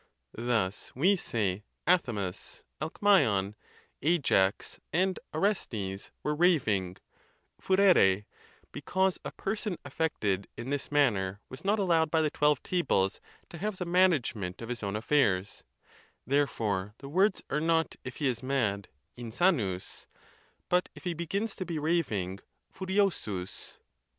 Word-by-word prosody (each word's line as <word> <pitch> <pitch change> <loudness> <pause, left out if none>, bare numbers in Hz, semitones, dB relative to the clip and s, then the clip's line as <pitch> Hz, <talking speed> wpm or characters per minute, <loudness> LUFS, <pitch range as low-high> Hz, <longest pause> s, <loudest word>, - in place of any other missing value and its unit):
Thus 110 -4 -1
we 180 +10 +4
say 105 - -2 0.2
Athamas, 115 - 0 0.2
Alemzon, 150 - +3 0.5
Ajax, 135 - +2
and 185 +3 +1
Orestes 115 - -2
were 150 - 0
raving 115 - +2 0.6
(fu 190 - +1
rere); 105 - +5 0.5
because 190 0 0
a - - -4
person 205 -2 -3
affected 130 - -1
in 120 +3 -5
this 145 0 -2
manner 105 -10 +2
was 130 - -9
not 205 +3 +2
allowed 170 -6 +2
by 160 0 +2
the 150 - +1
Twelve 150 -3 +2
Tables 105 - +1 0.3
to 170 - -8
have 210 +1 -2
the 180 - -3
management 155 - +2
of 115 - -7
his 125 -1 -4
own 100 -1 -2
affairs; 105 -5 +1 0.6
therefore 110 -8 0
the 140 - -10
words 190 +7 +2
are 150 - +1
not, 165 0 +1
if 130 - -7
he 145 - 0
is 120 -3 -1
mad 115 -7 0 0.3
(insanus), 120 - -1 0.6
but 180 0 +2
if - - -12
he 180 -2 -1
begins 195 +6 -2
to - - -2
be 170 -3 -4
raving 125 - 0 0.3
(furiosus). 185 - -2
140 Hz, 130 wpm, -30 LUFS, -, 0.6 s, rere